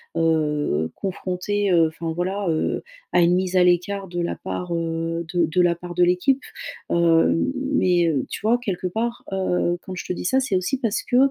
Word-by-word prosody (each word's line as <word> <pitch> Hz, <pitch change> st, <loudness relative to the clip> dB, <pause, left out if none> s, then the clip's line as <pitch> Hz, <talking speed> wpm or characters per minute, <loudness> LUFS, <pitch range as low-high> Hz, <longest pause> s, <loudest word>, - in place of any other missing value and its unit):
heu 150 Hz, -, +1 dB
confrontée, 195 Hz, +1 st, -2 dB
heu, 165 Hz, -2 st, +5 dB
enfin 160 Hz, +1 st, -5 dB
voilà, 190 Hz, +4 st, -2 dB
heu, 155 Hz, -, -1 dB, 0.3 s
à -, -, +3 dB
une 175 Hz, +1 st, +4 dB
mise 185 Hz, 0 st, 0 dB
à 180 Hz, -, +6 dB
l'écart 190 Hz, +3 st, +1 dB
de 175 Hz, -1 st, -3 dB
la 170 Hz, -, -2 dB
part, 180 Hz, -1 st, -4 dB
heu, 165 Hz, 0 st, -2 dB
de 175 Hz, -2 st, +3 dB
de 180 Hz, +3 st, +2 dB
la 175 Hz, -1 st, +3 dB
part 175 Hz, 0 st, -8 dB
de 180 Hz, -, +4 dB
l'équipe, 180 Hz, +10 st, +2 dB, 0.5 s
heu, 165 Hz, -1 st, +4 dB, 0.4 s
mais, 180 Hz, -8 st, +3 dB
heu, 145 Hz, -6 st, 0 dB
tu -, -, -5 dB
vois, 230 Hz, +3 st, +3 dB
quelque 190 Hz, -6 st, -3 dB
part, 235 Hz, +5 st, -3 dB
heu, 180 Hz, -2 st, 0 dB
quand 185 Hz, -, -8 dB
je -, -, -6 dB
te -, -, -2 dB
dis -, -, -6 dB
ça, 260 Hz, +8 st, +3 dB
c'est 255 Hz, -8 st, -1 dB
aussi 185 Hz, +9 st, 0 dB
parce 230 Hz, -4 st, -1 dB
que, 245 Hz, -, +1 dB
180 Hz, 200 wpm, -23 LUFS, 165-190 Hz, 0.5 s, à